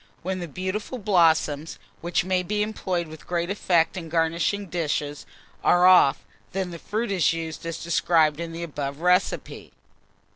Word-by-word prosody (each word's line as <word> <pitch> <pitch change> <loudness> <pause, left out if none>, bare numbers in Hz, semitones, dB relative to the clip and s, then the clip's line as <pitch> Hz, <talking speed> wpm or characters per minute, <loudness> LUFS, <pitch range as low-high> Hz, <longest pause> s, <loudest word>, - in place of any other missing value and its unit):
When 185 +1 -2
the 175 - -5
beautiful 190 - -4
blossoms, 165 -7 +2 0.2
which 175 +1 -1
may 185 -1 +1
be 210 +3 -1
employed 185 -5 -2
with 155 0 -12
great 175 +1 -1
effect 175 -5 +2
in 170 -3 -6
garnishing 170 +5 0
dishes, 150 -4 -3 0.4
are 175 0 +5
off, 180 -7 +6 0.3
then 190 -1 -2
the 170 - -8
fruit 215 +4 -3
is 180 -4 +2
used 165 0 -5
as 165 0 -4
described 165 -2 +2
in 170 -1 -4
the 165 +1 -6
above 145 -2 -5
recipe. 180 +2 0
170 Hz, 155 wpm, -25 LUFS, 160-185 Hz, 0.4 s, off